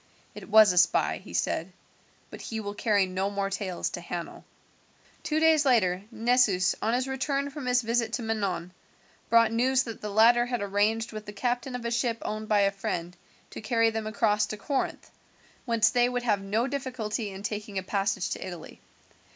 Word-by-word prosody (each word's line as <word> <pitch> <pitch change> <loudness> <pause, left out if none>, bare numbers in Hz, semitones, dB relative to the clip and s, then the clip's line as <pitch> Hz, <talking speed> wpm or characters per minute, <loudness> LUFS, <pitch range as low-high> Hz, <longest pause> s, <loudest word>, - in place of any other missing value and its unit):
"It - - -11
was 215 -2 +7
a 180 - +4
spy," 180 - +2
he - - -12
said, 160 - -1 0.6
"but - - -9
he 225 - -5
will 205 -1 -5
carry 205 -2 +2
no 185 +1 -2
more 200 -1 -2
tales 195 -3 -3
to 175 - -6
Hanno." 170 0 -6 0.8
Two 310 0 -1
days 320 -2 +4
later, 200 -9 +2
Nessus, 230 -5 +2
on 225 +2 +1
his 255 +1 -1
return 275 +1 -2
from 275 -2 -7
his 250 0 +2
visit 230 0 0
to 235 - -2
Manon, 200 -5 -2 0.6
brought 230 -1 +5
news 255 +3 +2
that 230 -3 -8
the 210 - -4
latter 235 +3 +5
had 245 -1 -2
arranged 210 +3 0
with 215 -1 -8
the - - -5
captain 245 +4 -2
of 245 -1 -6
a 235 - -1
ship 235 -1 0
owned 215 0 -4
by 210 -1 +4
a 200 0 +3
friend 180 -3 -4 0.4
to - - -8
carry 230 +1 +2
them 220 -1 -4
across 215 -2 +1
to 215 - -6
Corinth, 270 +7 -3 0.5
whence 230 -3 +3
they 245 0 +3
would 245 -1 -2
have 210 -4 +1
no 210 +4 0
difficulty 245 -6 -3
in 195 0 -9
taking 210 -1 -4
a 190 - -1
passage 195 -1 -1
to - - -4
Italy. 175 -4 -9
220 Hz, 190 wpm, -27 LUFS, 200-245 Hz, 0.8 s, was